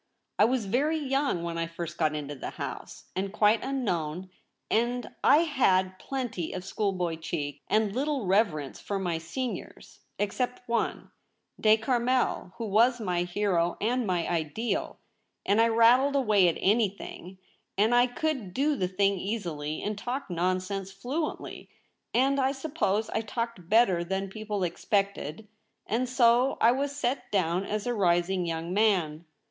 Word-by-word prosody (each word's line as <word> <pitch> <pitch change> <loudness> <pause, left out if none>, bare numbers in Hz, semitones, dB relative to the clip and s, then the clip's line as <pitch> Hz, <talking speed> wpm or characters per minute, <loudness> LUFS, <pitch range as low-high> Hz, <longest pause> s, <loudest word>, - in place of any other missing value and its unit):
I 210 - +7
was 245 -1 0
very 280 +10 +1
young 275 - 0
when 170 -1 -3
I 165 - -1
first 170 0 -7
got 155 -2 +2
into 145 -1 -4
the 135 - -6
House - - -7
— - - -38
and 195 +1 -2
quite 215 +1 +3
unknown; 185 - -2 0.4
and 240 +2 0
I 300 +4 +6
had 190 - +2
plenty 240 -11 -4
of 185 0 -5
school 200 +1 -1
boy 175 -3 -2
cheek, 145 -3 -4
and 215 -2 +2
little 280 -3 -1
reverence 180 -8 +1
for 200 - -3
my 175 -4 -1
seniors 235 +10 -6
— - - -45
except 245 +4 -2
one 235 0 -1 0.2
— - - -26
De 215 0 +6
Carmel 245 -3 0
— - - -27
who 230 - -3
\yas 240 +3 +5
my 180 -5 -1
hero 175 -1 0
and 240 +2 0
my 175 -2 0
ideal 170 +8 -2 0.2
— - - -50
and 205 +3 +4
I 230 - +5
rattled 240 +5 +5
away 210 -9 +4
at 170 - +1
anything; 200 -3 -1 0.4
and 215 +4 +3
I 245 +1 +5
could 245 - -3
do 290 +3 +2
the 185 - 0
thing 195 +1 +1
easily 170 -8 -3
and 210 +1 -2
talk 245 +2 -4
nonsense 185 +2 -1
fluently, 265 +11 -4 0.4
and 270 +3 +2
I 265 0 +2
suppose 265 -8 -1
I 220 - 0
talked 225 -5 -5
better 200 -6 +4
than 190 +2 -3
people 210 -2 -3
expected, 200 +1 -1 0.4
and 240 +4 -1
so 245 +1 +4
I 230 - +6
was 280 +2 -1
set 270 -1 -2
down 185 -1 +1
as 210 0 -3
a 245 - 0
rising 180 -2 +1
young 165 +1 -3
man. 180 -7 +1
205 Hz, 165 wpm, -28 LUFS, 180-245 Hz, 0.4 s, I